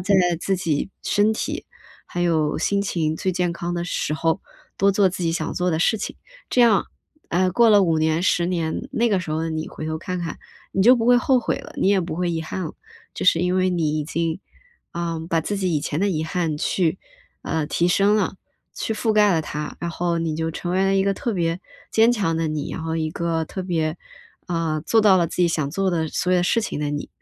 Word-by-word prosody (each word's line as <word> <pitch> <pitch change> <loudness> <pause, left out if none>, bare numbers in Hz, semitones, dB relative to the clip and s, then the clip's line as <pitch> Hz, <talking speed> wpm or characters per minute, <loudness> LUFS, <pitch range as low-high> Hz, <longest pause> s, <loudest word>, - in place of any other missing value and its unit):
在 195 +2 +1 0.3
自 195 -1 0
己 165 +1 -1
身 210 +2 +3
体 - - -3 0.4
还 175 - -4
有 160 -3 +1
心 200 0 +1
情 160 -5 -1
最 185 - -1
健 175 -1 0
康 175 +1 -4
的 170 0 -2
时 155 -3 -2
候， 165 +3 0 0.4
多 200 +1 +4
做 195 -1 +3
自 180 0 -5
己 165 - +1
想 175 - -2
做 180 0 0
的 160 - 0
事 220 - +3
情。 - - -5 0.3
这 250 - +3
样 230 -4 +5 0.4
哎， 185 +2 +2
过 230 +5 +5
了 205 -2 +6
5 165 -2 +2
年 160 +1 +1
10 175 -2 +2
年， 170 +6 -2
那 240 -3 +1
个 195 -3 +1
时 165 - -6
候 160 +1 -1
的 165 - -2
你 155 0 -3
回 155 - -7
头 160 0 -2
看 180 +1 -4
看， 165 -2 -5 0.3
你 190 - +2
就 245 +4 +7
不 230 0 -1
会 245 - +6
后 255 +1 +3
悔 240 - -1
了， - - -11
你 - - +1
也 200 -1 +4
不 170 -3 -4
会 175 0 0
遗 160 -1 -2
憾 185 +3 -4
了。 155 - -5 0.4
就 - - -4
是 175 - +5
因 180 +1 +1
为 185 0 +2
你 155 -3 0
已 150 - -2
经， 165 +1 -2 0.5
啊， 170 -1 -3
把 165 - +2
自 205 +6 -3
己 185 -4 0
以 150 - +1
前 150 - -3
的 200 - +2
遗 155 -3 -1
憾 160 -2 -2
去 175 +1 0 0.4
呃， 160 -2 -1
提 170 +3 +1
升 200 +3 +3
了， 200 -2 0 0.4
去 220 - -2
覆 220 +1 0
盖 210 -2 +5
了 165 - +2
它， 150 0 -5
然 170 - -2
后 170 0 -1
你 160 -2 -2
就 160 0 -1
成 175 +2 -5
为 190 +1 +2
了 195 0 +2
一 195 - +3
个 195 0 +1
特 235 +3 -2
别 170 -2 0 0.3
坚 225 +2 +5
强 190 -8 0
的 165 -1 0
你， 155 -2 -3
然 - - -5
后 160 0 -2
一 160 -1 -1
个 165 -1 -1
特 190 - -5
别， 165 -3 -1 0.5
啊， 165 -3 -1
做 225 +8 +3
到 205 -3 +6
了 175 -2 +2
自 - - -8
己 175 -1 +3
想 155 -4 -1
做 195 +3 0
的 165 -2 0
所 180 - -1
有 180 - +4
的 175 - +2
事 230 +6 +2
情 215 - -4
的 150 -1 -1
你。 145 0 -4
175 Hz, 260 characters per minute, -23 LUFS, 160-195 Hz, 0.5 s, 就